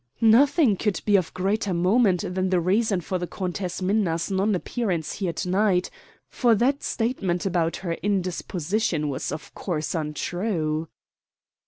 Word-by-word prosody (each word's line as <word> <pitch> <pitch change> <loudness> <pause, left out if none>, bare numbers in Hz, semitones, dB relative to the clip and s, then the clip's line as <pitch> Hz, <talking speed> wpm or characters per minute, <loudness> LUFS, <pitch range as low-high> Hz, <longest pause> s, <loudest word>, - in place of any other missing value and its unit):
"Nothing 255 - +5
could 210 -1 0
be 205 - +4
of 185 -4 +2
greater 195 0 0
moment 185 +1 +3
than 185 0 0
the 180 -1 +2
reason 195 +2 +1
for 185 +2 -3
the 175 - -3
Countess 185 0 -4
Minna's 185 -3 0
non 195 +2 +1
appearance 180 -6 -2
here 185 -4 -2
to 170 - -4
night; 190 -1 +2 0.4
for 240 -3 +2
that 270 +6 +1
statement 205 -7 -1
about 170 -3 0
her 170 - 0
indisposition 185 -3 -1
was, 135 - -3
of 155 - -7
course, 160 -5 -3
untrue." 160 0 -2
185 Hz, 145 wpm, -25 LUFS, 175-210 Hz, 0.4 s, Nothing